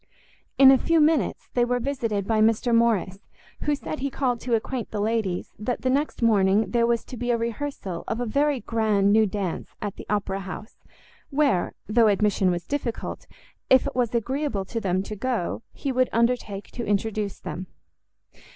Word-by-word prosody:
In 270 -1 +9
a 265 - +5
few 330 -1 +2
minutes 300 - +2
they 245 - +3
were 245 +1 +1
visited 230 -6 -2
by 220 0 +2
Mr 225 +2 +3
Morrice, 225 -5 +2 0.5
who 295 - +2
said 305 +2 -6
he 275 +1 -1
called 255 -3 -1
to 240 0 0
acquaint 235 +2 -3
the 210 - -4
ladies 210 -4 -1
that 230 +4 -2
the 255 - +2
next 280 -2 -1
morning 205 -1 +3
there 235 -1 +3
was 235 -1 +1
to - - -8
be 245 +1 -3
a 240 - +3
rehearsal 230 -6 -4
of 225 - -2
a 245 - -1
very 280 +3 +1
grand 210 -3 +2
new 220 0 +5
dance 195 -3 -4
at 205 -2 -5
the - - -9
Opera 195 -2 -1
House, 195 +3 -8 0.5
where, 280 -10 +1
though 225 +1 +4
admission 205 -2 +2
was 175 -1 -2
difficult, 270 -5 -4 0.4
if 260 -1 +6
it - - -4
was 245 -2 0
agreeable 250 -3 -1
to 230 +4 -4
them 185 -1 0
to 215 - -6
go, 230 -4 -2
he 275 - -3
would 255 0 +2
undertake 230 -4 0
to 240 - -5
introduce 210 -1 -1
them. 185 +1 -6
230 Hz, 185 wpm, -25 LUFS, 205-255 Hz, 0.5 s, In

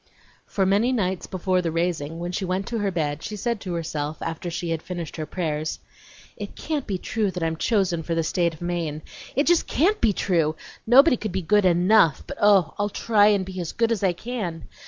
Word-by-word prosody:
For 195 - 0
many 205 +6 +3
nights 190 -7 -1
before 185 0 0
the 170 -2 -2
raising, 165 -2 -2
when 175 +1 -4
she 190 - -3
went 185 +1 -1
to 235 -1 -2
her 205 -1 0
bed 155 -4 -2
she 210 - -5
said 230 +1 -2
to 180 -2 -4
herself, 155 -2 -3
after 165 +2 -4
she 170 0 -3
had 165 -1 -2
finished 175 -3 -6
her 155 -1 -4
prayers: 155 -3 -2 0.6
"It - - -8
can't 300 -4 -3
be 195 -3 -1
true 215 +2 -1
that 180 -2 -4
I'm 165 0 0
chosen 190 -3 +1
for 165 +1 -3
the 165 - +1
State 170 0 0
of 155 - -10
Maine! 165 -3 -3 0.3
It 285 +4 +2
just 345 -1 +3
CAN'T 390 +9 +2
be 225 - +4
true! 165 -5 +1 0.3
Nobody 265 +3 +7
could 215 -2 -4
be 190 0 -2
good 205 +3 +3
ENOUGH, 175 -2 +4
but - - -8
oh, 195 -6 +5
I'll 205 0 +1
try 210 0 +3
to 190 - -3
be 185 -1 -6
as 170 - -5
good 230 0 +1
as 215 -3 -1
I 185 -2 +3
can! 180 -6 -5
185 Hz, 220 wpm, -24 LUFS, 165-210 Hz, 0.6 s, Nobody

